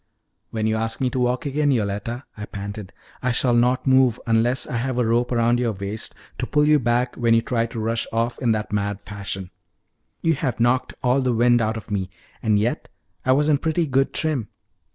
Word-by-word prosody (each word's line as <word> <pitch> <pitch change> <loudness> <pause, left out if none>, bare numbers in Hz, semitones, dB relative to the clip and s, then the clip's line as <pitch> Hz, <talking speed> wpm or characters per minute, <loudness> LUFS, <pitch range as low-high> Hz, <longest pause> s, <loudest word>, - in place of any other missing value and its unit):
"When 110 -1 -2
you 110 0 +1
ask 115 0 -2
me 130 -2 0
to 130 - -2
walk 125 +5 0
again, 145 +1 +1
Yoletta," 115 +1 -1
I 105 0 -7
panted, 100 -1 -7 0.3
"I 125 - +1
shall 120 +1 +2
not 125 +2 +2
move 130 -3 +4
unless 120 +2 +2
I 120 - -3
have 125 +1 -2
a 125 - +2
rope 120 +2 +1
round 120 0 +2
your 120 -3 0
waist 100 +2 -5 0.2
to - - -2
pull 150 0 +3
you 150 0 +5
back 120 0 0
when 115 -1 +3
you 115 - +3
try 115 -2 0
to 115 - -6
rush 115 +1 -1
off 115 +2 -1
in 120 -4 +2
that 105 -1 -3
mad 100 -1 -1
fashion. 100 -2 -6 0.7
You 165 - +3
have 135 -4 -2
knocked 120 +2 +1
all 125 +2 +3
the 130 -2 +1
wind 120 +1 +4
out 110 0 0
of 110 - -9
me; 95 -3 -1 0.3
and 110 -2 +2
yet 110 +4 -1 0.4
I 130 - +5
was 145 +3 +2
in 145 -2 +3
pretty 160 +1 0
good 135 -1 +1
trim." 150 -9 -1
120 Hz, 215 wpm, -23 LUFS, 110-130 Hz, 0.7 s, you